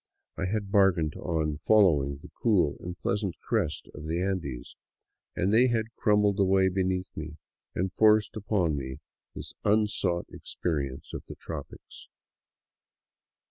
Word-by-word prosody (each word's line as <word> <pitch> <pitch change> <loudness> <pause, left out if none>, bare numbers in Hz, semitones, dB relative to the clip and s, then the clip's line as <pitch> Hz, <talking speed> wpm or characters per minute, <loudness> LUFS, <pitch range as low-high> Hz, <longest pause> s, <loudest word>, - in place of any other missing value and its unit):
I - - -2
had 100 0 -2
bargained 95 -6 +3
on 80 -3 -1
following 75 -7 +3
the - - -12
cool 100 -10 +3
and 90 0 -7
pleasant 100 -2 -2
crest 100 -10 -2
of 75 +1 -8
the 80 +2 -1
Andes, 90 -10 -3 0.6
and 95 +4 +1
they 120 +3 +6
had 115 -1 -1
crumbled 105 -1 +2
away 95 -1 +4
beneath 95 0 -1
me 80 0 -6 0.4
and 95 +1 -1
forced 110 -1 +4
upon 100 -7 0
me 65 -2 -5 0.4
this - - -8
un 105 +1 +4
sought 90 -4 -1
experience 70 -6 -4
of - - -6
the - - -9
tropics. - - -9
95 Hz, 140 wpm, -28 LUFS, 80-105 Hz, 0.6 s, they